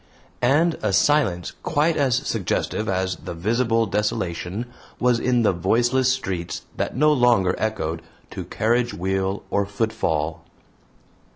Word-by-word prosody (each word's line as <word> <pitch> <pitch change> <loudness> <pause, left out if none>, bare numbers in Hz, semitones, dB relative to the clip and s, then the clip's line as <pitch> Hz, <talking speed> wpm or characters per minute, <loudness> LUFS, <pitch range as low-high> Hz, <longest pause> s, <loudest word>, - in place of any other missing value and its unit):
And 155 +7 +3
a 105 -2 0
silence 100 - +2
quite 155 +3 +1
as 135 -4 +2
suggestive 110 -4 -1
as 95 -1 -1
the 85 - -7
visible 115 +5 +1
desolation 100 0 -2 0.3
was 125 -1 +3
in 125 -1 +2
the 105 - +3
voiceless 120 +9 +2
streets 95 -10 -3
that - - -3
no 150 +2 +5
longer 120 -9 +3
echoed 85 -7 -2 0.3
to - - -6
carriage 120 +2 0
wheel 95 +3 -1
or 100 - +2
footfall. 85 -7 -1
110 Hz, 125 wpm, -23 LUFS, 95-125 Hz, 0.3 s, no